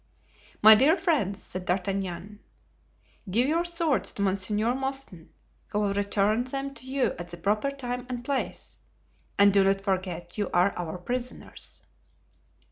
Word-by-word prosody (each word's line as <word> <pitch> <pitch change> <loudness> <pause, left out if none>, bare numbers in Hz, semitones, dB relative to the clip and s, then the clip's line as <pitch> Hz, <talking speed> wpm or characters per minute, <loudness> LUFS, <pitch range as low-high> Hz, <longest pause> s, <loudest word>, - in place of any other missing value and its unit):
"My 220 +1 +11
dear 270 +9 +5
friends," 280 - 0
said 185 0 -7
D'Artagnan, 190 +1 -2 0.9
"give 235 +7 +2
your 330 +3 +2
swords 335 -4 +1
to 200 - -2
Monsieur 205 +4 +1
Mouston, 265 -10 -4 0.4
who - - -3
will 205 -1 +1
return 205 +3 +1
them 275 +2 -4
to 260 -2 -10
you 265 0 0
at 175 0 -7
the 175 - -9
proper 210 +9 0
time 250 -2 -5
and 245 -1 -5
place, 275 -1 -3 0.6
and 200 0 +6
do 200 -1 +5
not 195 0 +2
forget 185 -2 -3
you 205 - 0
are 180 +3 +4
our 175 0 -4
prisoners." 245 +7 -5
210 Hz, 145 wpm, -27 LUFS, 190-260 Hz, 0.9 s, My